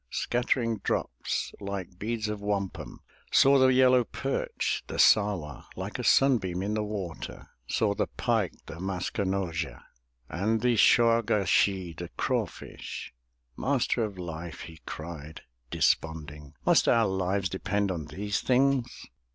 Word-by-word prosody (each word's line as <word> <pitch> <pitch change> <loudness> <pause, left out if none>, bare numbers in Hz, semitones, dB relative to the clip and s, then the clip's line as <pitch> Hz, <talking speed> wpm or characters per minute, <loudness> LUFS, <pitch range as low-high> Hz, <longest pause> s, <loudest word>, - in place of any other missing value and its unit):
Scattering 120 -2 0
drops - - -2
like 100 -3 -6
beads 110 0 -2
of 105 -1 -4
wampum, 100 -2 -3 0.3
Saw 135 0 +6
the 130 - +6
yellow 130 -1 +5
perch, 135 +4 -2
the - - -6
Sah'wa, 100 -9 +3
Like - - -5
a - - -3
sunbeam 95 -10 +3
in 105 +2 -1
the 110 0 0
water, 100 -5 -6 0.2
Saw 105 -2 +1
the - - -1
pike, - - 0
the 80 - -9
Mask 95 0 -3
e - - +3
no'zha, 95 -4 -2 0.5
And 105 +8 0
the 125 0 +3
Shaw' 115 +1 +5
ga 105 -2 +1
shee', 95 -1 +2
the - - -7
craw - - +1
fish! - - -9 0.4
"Master 130 -3 +1
of 105 -3 -4
Life!" 85 -1 -6
he 80 -1 -10
cried, 80 -1 -7 0.3
desponding, 75 -1 -1
"Must - - +4
our 115 -1 +4
lives 95 0 0
depend 100 +2 -1
on 80 -4 -4
these 100 +6 -3
things?" 130 -1 +1
100 Hz, 145 wpm, -28 LUFS, 90-115 Hz, 0.5 s, Saw